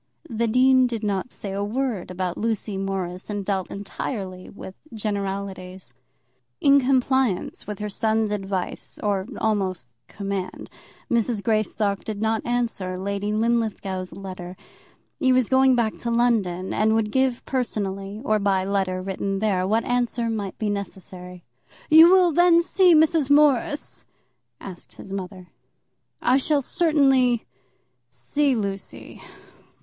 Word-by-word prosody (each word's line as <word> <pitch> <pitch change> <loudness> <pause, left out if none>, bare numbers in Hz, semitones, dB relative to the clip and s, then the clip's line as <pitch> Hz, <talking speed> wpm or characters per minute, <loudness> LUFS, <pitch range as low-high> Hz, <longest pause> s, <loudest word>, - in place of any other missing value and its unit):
The 230 +1 0
dean 255 +2 +4
did 230 -3 -4
not 205 +3 -2
say 200 - -6
a 200 +1 -2
word 230 -2 -2
about 180 -1 -3
Lucy 220 -2 -2
Morris, 190 -1 -4
and 205 -2 -3
dealt 190 -2 -1
entirely 195 -2 -6
with 190 - -10 0.2
generalities. 195 -3 -4 0.7
In 280 0 +5
compliance 260 -7 0
with 210 -1 -5
her 210 - -4
son's 220 +1 0
advice, 195 -2 -4
or 200 -1 0
almost 190 - -1 0.2
command, 195 -2 -5 0.4
Mrs. 230 -3 0
Greystock 215 -2 0
did 215 -2 -5
not 220 0 0
answer 230 -7 -1
Lady 200 +2 -2
Linlithgow's 215 -4 -1
letter. 185 -2 -8 0.6
He 260 - +3
was 255 -3 +3
going 265 0 +5
back 230 -3 0
to 235 - -3
London, 220 -7 +1
and 220 +1 +2
would 215 -1 0
give 260 -1 0
personally, 200 -5 -3
or 215 -3 +2
by 195 -2 +1
letter 190 -2 -1
written 195 +1 -2
there, 195 -3 0
what 220 +3 +1
answer 240 -1 0
might 205 -3 -4
be 215 -2 -1
necessary. 180 -2 -7 0.5
"You 325 +3 +9
will 370 -2 +5
then 340 +1 +5
see 360 -1 +4
Miss 315 -2 +3
Morris?" 295 +1 +2 0.6
asked 185 -3 -9
his 195 - -9
mother. 185 -1 -7 0.7
"I 255 - +4
shall 285 +1 +1
certainly 270 -7 +2 0.6
see 285 - 0
Lucy. 200 -3 -5
210 Hz, 135 wpm, -24 LUFS, 195-245 Hz, 0.7 s, You